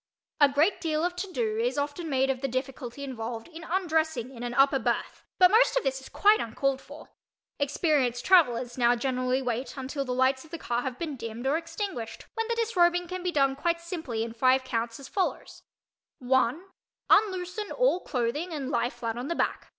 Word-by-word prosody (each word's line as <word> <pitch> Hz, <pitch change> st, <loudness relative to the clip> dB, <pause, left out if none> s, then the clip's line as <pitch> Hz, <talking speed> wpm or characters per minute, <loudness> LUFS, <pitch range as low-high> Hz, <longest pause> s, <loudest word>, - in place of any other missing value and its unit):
A 290 Hz, -1 st, +7 dB
great 300 Hz, +8 st, +2 dB
deal 315 Hz, -1 st, 0 dB
of 355 Hz, 0 st, -2 dB
"to 370 Hz, +1 st, -4 dB
do" 440 Hz, 0 st, -1 dB
is 480 Hz, -4 st, 0 dB
often 290 Hz, +4 st, -3 dB
made 270 Hz, -1 st, +2 dB
of 255 Hz, -1 st, -5 dB
the 275 Hz, -, 0 dB
difficulty 260 Hz, 0 st, -4 dB
involved 230 Hz, -3 st, -5 dB
in 330 Hz, 0 st, -10 dB
undressing 320 Hz, -8 st, 0 dB
in 235 Hz, -, -10 dB
an 240 Hz, 0 st, -4 dB
upper 275 Hz, 0 st, +4 dB
berth -, -, -2 dB
but 365 Hz, 0 st, +7 dB
most 460 Hz, +3 st, +5 dB
of -, -, +1 dB
this 265 Hz, 0 st, -1 dB
is -, -, -12 dB
quite 420 Hz, +1 st, +4 dB
uncalled 265 Hz, +4 st, -1 dB
for. -, -, -13 dB, 0.5 s
Experienced 285 Hz, -4 st, +1 dB
travellers 255 Hz, -9 st, +3 dB
now 240 Hz, 0 st, +4 dB
generally 255 Hz, +1 st, 0 dB
wait 250 Hz, +3 st, -3 dB
until 270 Hz, +2 st, -3 dB
the 255 Hz, -, -5 dB
lights 260 Hz, +1 st, +2 dB
of 320 Hz, -, -16 dB
the 335 Hz, -, -5 dB
car 240 Hz, -5 st, -2 dB
have 255 Hz, -1 st, -4 dB
been 305 Hz, -3 st, -4 dB
dimmed 230 Hz, +1 st, -6 dB
or 275 Hz, +3 st, +2 dB
extinguished 330 Hz, -, -5 dB
when 450 Hz, -1 st, -2 dB
the 470 Hz, -, 0 dB
disrobing 355 Hz, -6 st, +2 dB
can 365 Hz, +1 st, -5 dB
be 360 Hz, 0 st, -1 dB
done 275 Hz, -3 st, +2 dB
quite 335 Hz, +4 st, 0 dB
simply 320 Hz, -10 st, -4 dB
in 225 Hz, 0 st, -5 dB
five 255 Hz, +3 st, +3 dB
counts, 230 Hz, -2 st, -3 dB
as 275 Hz, -, -9 dB
follows: 380 Hz, -2 st, -3 dB, 0.6 s
One—unloosen 365 Hz, -, 0 dB
all -, -, +2 dB
clothing 280 Hz, +5 st, -2 dB
and 280 Hz, -3 st, -4 dB
lie 240 Hz, -1 st, +1 dB
flat 235 Hz, -1 st, -4 dB
on 250 Hz, -, -4 dB
the 340 Hz, -, -2 dB
back. -, -, -1 dB
275 Hz, 195 wpm, -28 LUFS, 250-350 Hz, 0.6 s, A